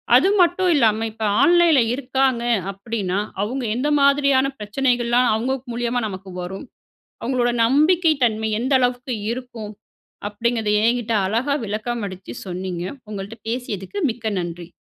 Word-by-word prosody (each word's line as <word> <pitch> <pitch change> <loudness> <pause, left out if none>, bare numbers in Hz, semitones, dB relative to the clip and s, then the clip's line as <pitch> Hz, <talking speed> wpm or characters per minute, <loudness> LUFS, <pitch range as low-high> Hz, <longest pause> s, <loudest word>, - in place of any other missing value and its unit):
அது 260 +9 +6
மட்டும் 360 +1 +3
இல்லாம, 225 -5 +3
இப்ப 220 0 -7 0.2
ஆன்லைன்ல 345 -5 +5
இருக்காங்க 260 -2 0 0.3
அப்டின்னா, 195 -1 -3 0.2
அவுங்க 255 +5 -3
எந்த 280 +4 0
மாதிரியான 280 -1 +4
பிரச்சனைகள்லாம் 240 +2 +1
அவுங்க 255 +4 -1 0.2
மூலியமா 240 +1 -1
நமக்கு 190 -1 -8
வரும். 190 +6 -7 0.6
அவுங்களோட 245 0 +1
நம்பிக்கை 315 +7 +4
தன்மை 220 -1 0
எந்த 260 +3 -1
அளவுக்கு 250 0 -1 0.2
இருக்கும். 235 -4 -7 0.6
அப்டிங்கிறத, 225 +1 -1
என்கிட்ட 235 -1 +1
அழகா 235 +8 0
விளக்கமளிச்சு 210 -3 -4
சொன்னீங்க. 180 -1 -4 0.3
உங்கள்ட்ட 205 +2 -7
பேசியதுக்கு, 235 - -4
மிக்க 220 -2 -3
நன்றி. 175 0 -7
235 Hz, 120 wpm, -21 LUFS, 210-265 Hz, 0.6 s, அது